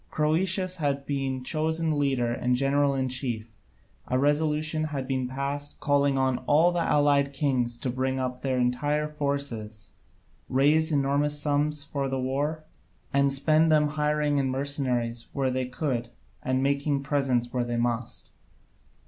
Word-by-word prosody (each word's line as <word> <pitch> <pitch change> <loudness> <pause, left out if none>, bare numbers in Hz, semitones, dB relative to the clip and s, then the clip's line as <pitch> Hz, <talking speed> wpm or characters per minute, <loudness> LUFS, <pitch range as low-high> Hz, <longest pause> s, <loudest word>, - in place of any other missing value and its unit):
Croesus 185 +4 0
had 140 -3 -1
been 135 -2 -2
chosen 160 +1 0
leader 130 -4 +1
and 125 0 0
general 140 +1 +2
in 130 -1 0
chief; 120 -4 -3 0.5
a 130 - +1
resolution 155 +2 +1
had 140 -4 -4
been 130 -2 -1
passed, 140 +2 -4
calling 140 -1 +2
on 130 -1 +1
all 160 +4 +5
the 175 - -1
allied 145 -2 +2
kings 130 -4 0
to 125 - -2
bring 130 +1 -1
up 125 -1 -3
their 130 -2 -1
entire 145 +5 0
forces, 140 -8 -4 0.6
raise 150 +5 +3
enormous 145 +1 +1
sums 145 0 0
for 140 -1 -3
the 135 0 -2
war, 145 +5 -2 0.5
and 140 0 +3
spend 155 +4 +3
them 155 -1 +5
in 150 - 0
hiring 150 -1 +1
mercenaries 130 -4 -1
where 135 -2 0
they 130 0 -1
could 125 -3 -2 0.3
and 130 +1 0
making 140 0 0
presents 135 -4 0
where 125 -1 0
they 120 0 -3
must. 120 0 -2
140 Hz, 150 wpm, -27 LUFS, 130-150 Hz, 0.6 s, all